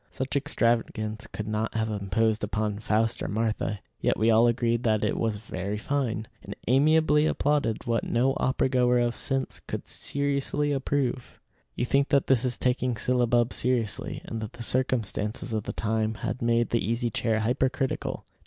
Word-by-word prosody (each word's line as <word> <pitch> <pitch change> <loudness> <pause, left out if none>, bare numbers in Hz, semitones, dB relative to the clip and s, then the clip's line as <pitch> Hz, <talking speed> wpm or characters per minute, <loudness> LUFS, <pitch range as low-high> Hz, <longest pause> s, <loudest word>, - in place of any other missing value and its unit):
Such 130 +2 -4
extravagance 115 -5 0
could 105 - -6
not 110 +1 -2
have 110 0 0
imposed 105 +2 0
upon 105 0 -1
Faust 110 +2 0
or - - -2
Martha; 110 -1 -1 0.2
yet - - +1
we 110 +2 +3
all 115 +2 +5
agreed 120 -1 +1
that 110 -3 +1
it - - +1
was 115 -2 0
very 100 -1 -4
fine, 115 -3 -2
and - - -8
amiably 150 +3 +4
applauded 145 -8 0
what 115 -1 0
no 130 +3 +2
opera 130 0 +1
goer 125 -1 +3
of 120 -1 +1
sense 135 -1 -2
could - - -5
seriously 140 +1 -1
approve. 135 -2 -1 0.4
You 120 - 0
think 140 +3 +2
that 140 -1 +3
this 130 -3 +3
is 125 -2 -1
taking 125 -1 0
syllabub 120 0 +2
seriously, 120 -4 -1
and 115 - -5
that 110 - -6
the 120 - -7
circumstances 115 -2 -1
of 110 -2 -2
the - - -3
time 110 0 -1
had 110 +2 -4
made 115 0 +2
the 115 - +1
Easy 115 +3 -1
Chair 110 -1 0
hypercritical. 130 +3 -1
120 Hz, 170 wpm, -27 LUFS, 110-130 Hz, 0.4 s, all